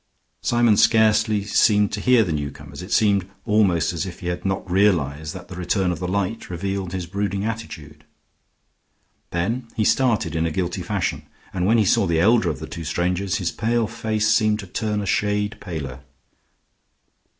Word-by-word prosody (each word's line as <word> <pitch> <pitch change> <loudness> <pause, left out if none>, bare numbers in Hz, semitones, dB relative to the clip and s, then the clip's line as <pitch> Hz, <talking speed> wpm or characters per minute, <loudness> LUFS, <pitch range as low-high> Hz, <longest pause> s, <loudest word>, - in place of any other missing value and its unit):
Symon 120 -3 +3
scarcely 110 -1 +3
seemed 105 0 +3
to 105 - -3
hear 125 -1 +5
the 90 - -3
newcomers; 70 -1 -5
it 90 +4 -9
seemed 100 -4 +2 0.2
almost 100 -7 +2
as 85 - -2
if 90 -2 -8
he 90 - -3
had 90 - -4
not 95 0 -2
realized 80 -6 +1
that 90 - -9
the 90 - -9
return 90 +1 0
of 85 - -4
the 90 - -3
light 100 +4 -2
revealed 95 +1 -3
his 90 -1 -4
brooding 100 +2 -2
attitude. 80 -10 -6 1.3
Then 115 +8 -2
he 110 - +1
started 120 -8 +2
in 80 0 +1
a - - -3
guilty 85 +2 -2
fashion, - - -2 0.3
and 90 0 0
when 115 +3 +4
he 110 - +3
saw 105 0 +3
the 85 -1 +1
elder 110 0 +4
of 80 - -3
the - - -7
two 85 - -7
strangers, 90 +4 -1
his 90 -4 -1
pale 115 +1 0
face 110 -1 -1
seemed 110 0 +3
to - - -9
turn 105 +3 -2
a - - -4
shade 105 +1 0
paler. 70 -8 -6
100 Hz, 180 wpm, -22 LUFS, 85-110 Hz, 1.3 s, hear